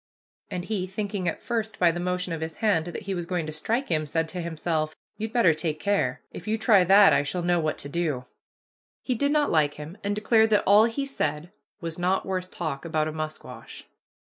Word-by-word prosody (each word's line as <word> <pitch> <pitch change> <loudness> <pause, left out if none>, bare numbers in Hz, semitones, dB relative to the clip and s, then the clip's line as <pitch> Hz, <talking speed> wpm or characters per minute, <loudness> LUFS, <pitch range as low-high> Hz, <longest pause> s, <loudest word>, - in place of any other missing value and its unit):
and 180 -1 -4
he, 195 -4 -2
thinking 195 -1 -3
at 165 - -3
first, 225 -2 -2
by 175 -2 +4
the 175 - -5
motion 180 0 -2
of 160 - -4
his 160 0 -4
hand, 200 -8 +1
that 175 - -6
he 195 0 -3
was 175 -2 -4
going 175 -3 -1
to 155 - -6
strike 230 - -1
him, 155 -2 0
said 160 +2 0
to 180 +2 -4
himself, 160 -2 -2 0.2
"You'd 220 +1 -4
better 230 -9 +4
take 155 0 -2
care; 200 +4 0
if - - -9
you 220 +1 +1
try 215 -4 +5
that 195 -2 +7
I 140 - +4
shall 175 +5 -3
know 175 0 +2
what 155 -2 -1
to - - -5
do." 145 -5 -2 0.8
He 255 - 0
did 285 +5 +1
not 300 -1 +2
like 150 -3 +2
him, 155 +7 -9
and 205 0 -1
declared 220 +1 +3
that 210 -1 +3
all 205 +3 +7
he 255 +5 -2
said 155 - -2 0.3
"was 165 0 -5
not 185 +2 +1
worth 185 -1 -3
talk 155 -7 -4
about 155 -2 0
a - - -3
musquash." 155 0 -7
175 Hz, 220 wpm, -26 LUFS, 160-205 Hz, 0.8 s, that